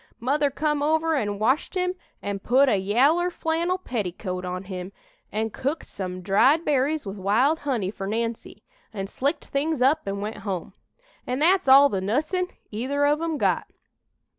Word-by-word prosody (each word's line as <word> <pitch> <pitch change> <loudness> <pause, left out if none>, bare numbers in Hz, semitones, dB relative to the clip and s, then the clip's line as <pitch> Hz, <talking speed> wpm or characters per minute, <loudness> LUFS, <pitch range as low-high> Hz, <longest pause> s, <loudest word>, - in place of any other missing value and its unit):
Mother 285 +4 +1
come 300 +1 -1
over 315 +2 +2
an' 205 -7 -1
washed 260 - +1
him 365 0 0 0.3
an' 200 -1 -3
put 260 +7 +3
a 215 - +3
yaller 270 - +3
flannel 340 +1 -1
petticoat 185 - -4
on 180 +1 -4
him, 185 -1 -6 0.4
an' 220 +1 -2
cooked 280 +9 -3
some 185 -1 -6
dried 260 - +4
berries 290 +1 +1
with 195 0 -6
wild 240 - +2
honey 235 -10 -1
fur 195 -2 -6
Nancy, 230 +2 -4 0.3
an' 195 -3 -4
slicked 275 - -2
things 295 +1 -1
up 280 +5 +3
an' 200 0 -2
went 210 +2 -4
home. 190 -5 -5 0.5
An' 250 - -1
that's 350 +3 +3
all 275 +2 +8
the 195 -8 -2
nuss'n 310 - 0 0.2
either 265 +7 0
of 295 +2 +2
'em 330 -2 -1
got. - - +1
260 Hz, 165 wpm, -25 LUFS, 200-305 Hz, 0.5 s, all